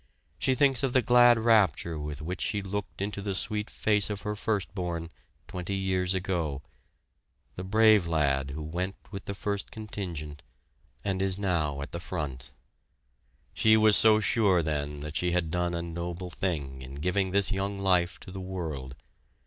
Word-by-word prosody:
She 130 Hz, -, +2 dB
thinks 135 Hz, -1 st, +3 dB
of 135 Hz, -3 st, 0 dB
the 130 Hz, -, +4 dB
glad 120 Hz, -1 st, +6 dB
rapture 100 Hz, -8 st, +3 dB
with 75 Hz, 0 st, -5 dB
which 90 Hz, +3 st, -4 dB
she 105 Hz, -2 st, 0 dB
looked 100 Hz, 0 st, -4 dB
into 100 Hz, 0 st, -3 dB
the 100 Hz, -1 st, -3 dB
sweet 105 Hz, +2 st, -1 dB
face 105 Hz, -1 st, +1 dB
of 100 Hz, -1 st, -4 dB
her 105 Hz, 0 st, -2 dB
first 105 Hz, -3 st, -2 dB
born 85 Hz, -3 st, -4 dB, 0.4 s
twenty 90 Hz, +2 st, -4 dB
years 95 Hz, -1 st, 0 dB
ago 85 Hz, -7 st, -2 dB, 0.9 s
the 90 Hz, -, -5 dB
brave 105 Hz, -1 st, +5 dB
lad 70 Hz, -4 st, +1 dB
who 75 Hz, +3 st, -5 dB
went 90 Hz, +5 st, -3 dB, 0.2 s
with 100 Hz, -2 st, -7 dB
the 100 Hz, -, -4 dB
first 100 Hz, 0 st, -3 dB
contingent, 85 Hz, -9 st, -6 dB, 0.6 s
and 95 Hz, -1 st, 0 dB
is 95 Hz, -1 st, +1 dB
now 80 Hz, -8 st, 0 dB
at -, -, -8 dB
the -, -, -4 dB
front. 65 Hz, -4 st, -5 dB, 1.0 s
She 110 Hz, 0 st, +5 dB
was 110 Hz, -1 st, +5 dB
so 110 Hz, -1 st, +6 dB
sure 100 Hz, -5 st, +3 dB
then 75 Hz, -2 st, -2 dB
that 75 Hz, +1 st, -6 dB
she 90 Hz, +2 st, 0 dB
had 85 Hz, -3 st, 0 dB
done 90 Hz, 0 st, 0 dB
a 85 Hz, -, -2 dB
noble 85 Hz, +1 st, -5 dB
thing 70 Hz, -9 st, -3 dB
in 65 Hz, +1 st, -9 dB
giving 90 Hz, +6 st, 0 dB
this 100 Hz, +2 st, +2 dB
young 100 Hz, 0 st, -1 dB
life 90 Hz, -3 st, +2 dB
to -, -, -10 dB
the 95 Hz, 0 st, -6 dB
world. 80 Hz, -9 st, -5 dB
95 Hz, 175 wpm, -28 LUFS, 80-100 Hz, 1.0 s, glad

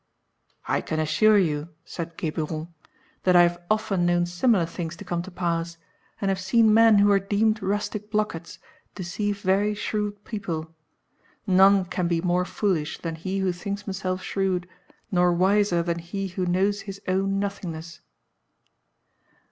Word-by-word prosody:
"I -, -, +1 dB
can 155 Hz, -, -3 dB
assure 185 Hz, +8 st, +4 dB
you," 155 Hz, -4 st, 0 dB, 0.2 s
said 170 Hz, -1 st, -7 dB
Geburon, 160 Hz, +1 st, -4 dB, 0.5 s
"that 180 Hz, -1 st, +3 dB
I 175 Hz, -, +8 dB
have 175 Hz, 0 st, 0 dB
often 215 Hz, -4 st, +1 dB
known 175 Hz, 0 st, +2 dB
similar 175 Hz, +2 st, +2 dB
things 170 Hz, 0 st, -5 dB
to -, -, -11 dB
come 175 Hz, -1 st, -2 dB
to 185 Hz, -, -8 dB
pass, 170 Hz, -2 st, -2 dB, 0.4 s
and 195 Hz, -, 0 dB
have 190 Hz, -1 st, 0 dB
seen 215 Hz, +4 st, +4 dB
men 225 Hz, -1 st, +6 dB
who 200 Hz, 0 st, +5 dB
were 200 Hz, -1 st, +5 dB
deemed 215 Hz, +2 st, +1 dB
rustic 205 Hz, +2 st, -2 dB
blockheads 210 Hz, -6 st, -2 dB, 0.4 s
deceive 200 Hz, +2 st, -3 dB
very 200 Hz, +3 st, +2 dB
shrewd 210 Hz, -1 st, -3 dB
people. 165 Hz, -7 st, -5 dB, 0.7 s
None 195 Hz, 0 st, +5 dB
can 180 Hz, -1 st, -2 dB
be 170 Hz, -1 st, +1 dB
more 180 Hz, +1 st, +1 dB
foolish 180 Hz, -7 st, -1 dB
than 165 Hz, -1 st, -4 dB
he 185 Hz, +4 st, -4 dB
who 190 Hz, -1 st, +1 dB
thinks 200 Hz, +3 st, -5 dB
himself 185 Hz, -2 st, -3 dB
shrewd, 185 Hz, -2 st, -1 dB, 0.4 s
nor 180 Hz, -1 st, +3 dB
wiser 185 Hz, -1 st, +2 dB
than 170 Hz, 0 st, -2 dB
he 190 Hz, +3 st, -4 dB
who 180 Hz, 0 st, -3 dB
knows 195 Hz, +3 st, +1 dB
his 195 Hz, -1 st, -8 dB
own 195 Hz, +1 st, +1 dB
nothingness." 170 Hz, -5 st, -5 dB
185 Hz, 155 wpm, -25 LUFS, 170-200 Hz, 0.7 s, I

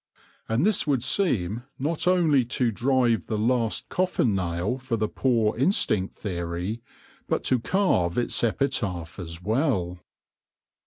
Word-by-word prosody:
And 115 Hz, +9 st, +2 dB
this 210 Hz, -6 st, +2 dB
would 135 Hz, -5 st, +1 dB
seem 120 Hz, -, 0 dB, 0.2 s
not 155 Hz, +5 st, -2 dB
only 165 Hz, -7 st, +4 dB
to 120 Hz, 0 st, 0 dB
drive 120 Hz, 0 st, +1 dB
the 110 Hz, -, -2 dB
last 115 Hz, 0 st, 0 dB
coffin 180 Hz, -, 0 dB
nail 90 Hz, +6 st, -2 dB
for 130 Hz, -3 st, -2 dB
the 110 Hz, 0 st, 0 dB
poor 115 Hz, -3 st, +1 dB
instinct 115 Hz, -, +1 dB
theory, 90 Hz, +3 st, -4 dB, 0.5 s
but -, -, -1 dB
to 130 Hz, -, +2 dB
carve 115 Hz, -, +1 dB
its 120 Hz, -, +1 dB
epitaph 100 Hz, -, -1 dB
as 85 Hz, 0 st, -7 dB
well. 105 Hz, -, 0 dB
115 Hz, 135 wpm, -25 LUFS, 95-135 Hz, 0.5 s, only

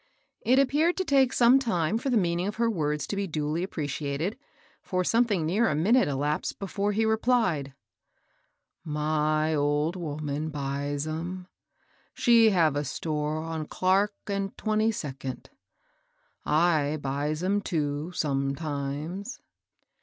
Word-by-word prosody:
It 255 Hz, +3 st, +4 dB
appeared 295 Hz, +6 st, +3 dB
to 375 Hz, -, -1 dB
take 270 Hz, -4 st, +4 dB
some 250 Hz, +1 st, +5 dB
time 215 Hz, -5 st, 0 dB
for 270 Hz, -, -2 dB
the 245 Hz, -, +3 dB
meaning 175 Hz, -1 st, 0 dB
of 210 Hz, -, -3 dB
her 230 Hz, 0 st, +1 dB
words 150 Hz, -6 st, -1 dB
to -, -, -4 dB
be 200 Hz, 0 st, -2 dB
duly 155 Hz, 0 st, -2 dB
appreciated, 150 Hz, +1 st, -3 dB, 0.5 s
for 185 Hz, -1 st, -1 dB
something 215 Hz, -5 st, +2 dB
near 210 Hz, +8 st, +2 dB
a -, -, 0 dB
minute 220 Hz, -, +3 dB
elapsed 145 Hz, +2 st, -1 dB
before 200 Hz, +1 st, -2 dB
he 220 Hz, +2 st, +1 dB
replied, 220 Hz, -, +1 dB, 1.1 s
"My 155 Hz, 0 st, 0 dB
old 145 Hz, +3 st, +1 dB
woman 150 Hz, -2 st, -3 dB
buys 145 Hz, 0 st, -3 dB
'em. 170 Hz, +4 st, -4 dB, 0.7 s
She 230 Hz, -2 st, +5 dB
have 165 Hz, -7 st, +3 dB
a 145 Hz, -, 0 dB
store 150 Hz, +1 st, -2 dB
on 160 Hz, -2 st, -4 dB
Clark 195 Hz, +3 st, +1 dB
and 195 Hz, -1 st, -3 dB
Twenty 215 Hz, 0 st, +1 dB
second. 135 Hz, -, -6 dB, 1.0 s
I 155 Hz, -2 st, +2 dB
buys 145 Hz, +4 st, -2 dB
'em 200 Hz, +2 st, +1 dB
too, 150 Hz, -2 st, -2 dB
sometimes." 145 Hz, -, -3 dB
165 Hz, 130 wpm, -27 LUFS, 150-210 Hz, 1.1 s, some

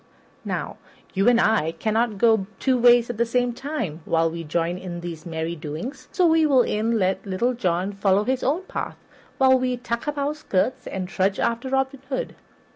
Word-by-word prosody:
Now, -, -, -3 dB, 0.4 s
you 195 Hz, +5 st, +4 dB
and 240 Hz, -1 st, +4 dB
I 205 Hz, -9 st, +2 dB
cannot 220 Hz, +4 st, 0 dB
go 220 Hz, -3 st, +3 dB
two 260 Hz, -1 st, +2 dB
ways 240 Hz, -1 st, +5 dB
at 235 Hz, -, -9 dB
the -, -, +5 dB
same 245 Hz, 0 st, +1 dB
time 245 Hz, -, -4 dB
while 165 Hz, 0 st, +2 dB
we 165 Hz, 0 st, -5 dB
join 170 Hz, +3 st, -1 dB
in 175 Hz, -2 st, -6 dB
these 170 Hz, -2 st, -7 dB
merry 165 Hz, +1 st, -3 dB
doings; 155 Hz, -, -6 dB
so 365 Hz, -, +2 dB
we 325 Hz, -1 st, +4 dB
will 270 Hz, -5 st, +4 dB
e'en 225 Hz, +2 st, 0 dB
let 190 Hz, -1 st, 0 dB
Little 205 Hz, +6 st, 0 dB
John 185 Hz, -4 st, -1 dB
follow 195 Hz, 0 st, +2 dB
his 260 Hz, +2 st, -1 dB
own 305 Hz, +8 st, 0 dB
path -, -, -5 dB, 0.4 s
while 260 Hz, -1 st, +5 dB
we 255 Hz, -1 st, -1 dB
tuck 235 Hz, +1 st, -4 dB
up 295 Hz, 0 st, -2 dB
our 285 Hz, +1 st, 0 dB
skirts 255 Hz, -4 st, -1 dB
and 185 Hz, -1 st, -4 dB
trudge 190 Hz, +1 st, 0 dB
after 235 Hz, +3 st, -1 dB
Robin 265 Hz, 0 st, -1 dB
Hood. 260 Hz, -, -3 dB
230 Hz, 195 wpm, -24 LUFS, 185-255 Hz, 0.4 s, ways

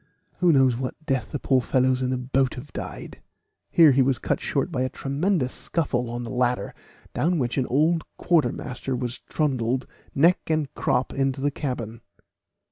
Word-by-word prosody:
Who 180 Hz, -1 st, +5 dB
knows 135 Hz, -4 st, +4 dB
what 130 Hz, 0 st, -3 dB
death 135 Hz, -4 st, -1 dB
the -, -, -2 dB
poor 130 Hz, -1 st, +2 dB
fellows 130 Hz, +1 st, +2 dB
in 130 Hz, -, 0 dB
the 130 Hz, -, 0 dB
boat 130 Hz, +1 st, 0 dB
have 135 Hz, +3 st, -10 dB
died!" -, -, -7 dB, 0.5 s
Here 160 Hz, -4 st, +7 dB
he 135 Hz, +1 st, +4 dB
was 130 Hz, -1 st, +2 dB
cut -, -, -1 dB
short 140 Hz, +4 st, -1 dB
by 130 Hz, -5 st, -1 dB
a 130 Hz, -, 0 dB
tremendous 140 Hz, +1 st, -1 dB
scuffle 125 Hz, -7 st, -2 dB
on 120 Hz, +1 st, -4 dB
the 115 Hz, -, -6 dB
ladder, 125 Hz, -5 st, 0 dB, 0.4 s
down 175 Hz, +3 st, +1 dB
which 125 Hz, -4 st, -1 dB
an 130 Hz, -, 0 dB
old 160 Hz, +5 st, +2 dB
quartermaster 135 Hz, -6 st, 0 dB
was 125 Hz, 0 st, -3 dB
trundled 130 Hz, -4 st, -1 dB, 0.3 s
neck 170 Hz, +6 st, +5 dB
and 155 Hz, -3 st, -1 dB
crop 125 Hz, 0 st, 0 dB
into 135 Hz, 0 st, 0 dB
the 145 Hz, +1 st, 0 dB
cabin. 120 Hz, -5 st, -4 dB
130 Hz, 175 wpm, -25 LUFS, 125-145 Hz, 0.5 s, Here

